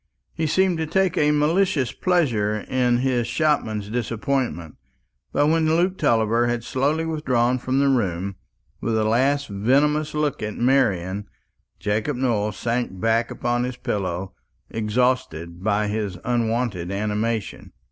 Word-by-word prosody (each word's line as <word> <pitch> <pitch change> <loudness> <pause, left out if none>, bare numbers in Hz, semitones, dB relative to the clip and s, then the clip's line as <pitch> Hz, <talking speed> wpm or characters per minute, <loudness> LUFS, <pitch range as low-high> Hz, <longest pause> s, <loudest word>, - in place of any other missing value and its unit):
He 160 - -1
seemed 185 +1 +2
to 160 - -1
take 190 +2 +1
a 150 - +3
malicious 150 - +2
pleasure 120 - +1
in 125 0 +1
his 120 -3 +1
shopman's 115 -11 0
disappointment. 115 - -2 0.5
But 145 - +2
when 160 +1 +2
Luke 180 +3 +1
Tulliver 115 -4 +2
had 120 -1 -1
slowly 145 +7 0
withdrawn 130 -6 +1
from 130 +2 -1
the 140 0 +3
room, 100 -7 0 0.4
with 115 -1 -1
a 110 - +2
last 135 +6 +2
venomous 145 +9 +1
look 150 -2 -1
at 105 0 -3
Marian, 105 -7 +1 0.5
Jacob 110 +7 -1
Nowell 110 -5 0
sank 115 -3 -2
back 115 +2 +1
upon 120 0 -1
his 125 0 -4
pillow 95 -4 -3 0.4
exhausted 105 -7 -1
by 105 0 +1
his 105 -3 -2
unwonted 115 -6 -1
animation. 105 +2 -2
120 Hz, 135 wpm, -23 LUFS, 105-140 Hz, 0.5 s, a